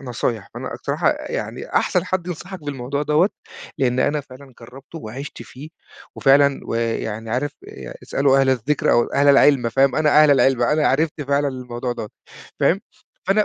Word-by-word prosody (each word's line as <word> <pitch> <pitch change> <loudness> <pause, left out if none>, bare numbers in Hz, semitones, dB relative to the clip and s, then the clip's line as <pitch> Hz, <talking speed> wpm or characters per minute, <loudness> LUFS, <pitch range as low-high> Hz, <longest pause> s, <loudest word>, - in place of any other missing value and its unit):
نصايح، 120 -5 -3
فأنا - - -6
الصراحة - - 0
يعني - - -5
أحسن - - +1
حد 185 -2 -2
ينصحك 180 +1 -7
بالموضوع 140 0 -3
دوَّة، 150 +6 +3 0.5
لإن 130 -1 +1
أنا 145 +3 +1
فعلًا 135 0 -15
جرّبته 135 +7 -12
وعِشت 135 +4 -8
فيه 140 +4 -11 0.5
وفعلًا 140 0 +4
ويعني 115 -1 -3
عارف 140 +4 -1 0.2
ي 65 -2 -9
اسألوا 135 -1 +2
أهل 135 -1 +3
الذِكْر 130 +3 0
أو 120 - +4
أهل 140 +1 +1
العِلم، 140 -3 +5
فاهم؟ 135 +3 +2
أنا 155 -1 +5
أهل 150 - +5
العِلم، 135 -2 +3
أنا 150 +5 +2
عرفت 150 +2 0
فعلًا 140 0 0
الموضوع 125 -1 -5
دوَّة، 115 -3 -6 0.5
فاهم؟ 190 +4 +3 0.5
فأنا 205 +3 +3
135 Hz, 160 wpm, -21 LUFS, 125-150 Hz, 0.5 s, العِلم